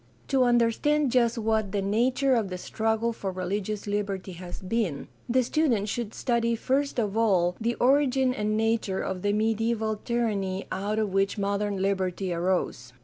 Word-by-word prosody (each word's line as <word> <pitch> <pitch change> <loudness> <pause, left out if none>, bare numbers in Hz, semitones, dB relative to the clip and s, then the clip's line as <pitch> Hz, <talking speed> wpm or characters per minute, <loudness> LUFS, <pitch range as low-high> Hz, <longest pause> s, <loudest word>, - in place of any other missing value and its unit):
To 270 -2 +3
understand 245 +4 +2
just 235 -1 +2
what 220 -2 0
the 200 - +1
nature 250 +7 +2
of 225 -5 +1
the 180 - -4
struggle 225 +4 -1
for 195 -3 -4
religious 195 +3 -3
liberty 200 -2 -2
has 175 0 -8
been, 185 -6 -2 0.2
the 255 +2 +3
student 235 -7 +1
should 225 0 -3
study 235 -1 +1
first 275 +5 0
of 210 -3 -1
all 185 -6 +2
the 235 +1 0
origin 265 -1 +3
and 215 -2 -1
nature 220 -3 0
of 185 -1 -3
the 205 - +1
mediaeval 220 +1 0
tyranny 205 -5 -1
out 205 +3 -2
of 215 -3 -1
which 195 +2 +1
modern 200 0 -1
liberty 190 -1 -1
arose. 170 -8 -1
215 Hz, 160 wpm, -27 LUFS, 195-235 Hz, 0.2 s, To